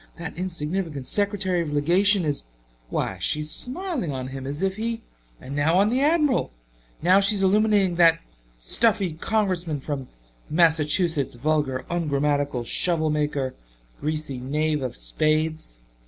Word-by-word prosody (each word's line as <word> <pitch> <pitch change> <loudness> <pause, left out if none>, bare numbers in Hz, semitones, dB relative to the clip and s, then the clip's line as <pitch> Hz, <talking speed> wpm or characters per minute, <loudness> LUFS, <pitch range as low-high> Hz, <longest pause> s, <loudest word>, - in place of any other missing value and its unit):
That 170 - -7
insignificant 165 -4 -3
secretary 200 -2 +1
of 160 -3 -4
legation 180 +6 +3
is 145 - -1 0.4
why, - - -2
she's 150 0 +1
smiling 270 - -1
on 130 -1 -5
him 135 0 -7
as 145 +6 -3
if 190 0 -1
he 230 +1 -3 0.4
and 135 - -8
now 155 +4 +2
on 200 +2 +4
the 255 +3 +1
Admiral! 295 -3 +2 0.5
Now 185 +3 +5
she's 200 0 +4
illuminating 200 -2 +3
that 165 -1 +6 0.4
stuffy 195 - +1
Congressman 180 -4 -1
from 135 -2 -5 0.4
Massachusetts 160 -2 +2
vulgar 135 -1 -1
ungrammatcal 145 -5 -1
shovel 160 +4 +2
maker 145 -3 -1 0.5
greasy 150 -3 -3
knave 150 +3 -1
of 125 -2 -4
spades. 155 - -1
160 Hz, 130 wpm, -24 LUFS, 145-195 Hz, 0.5 s, that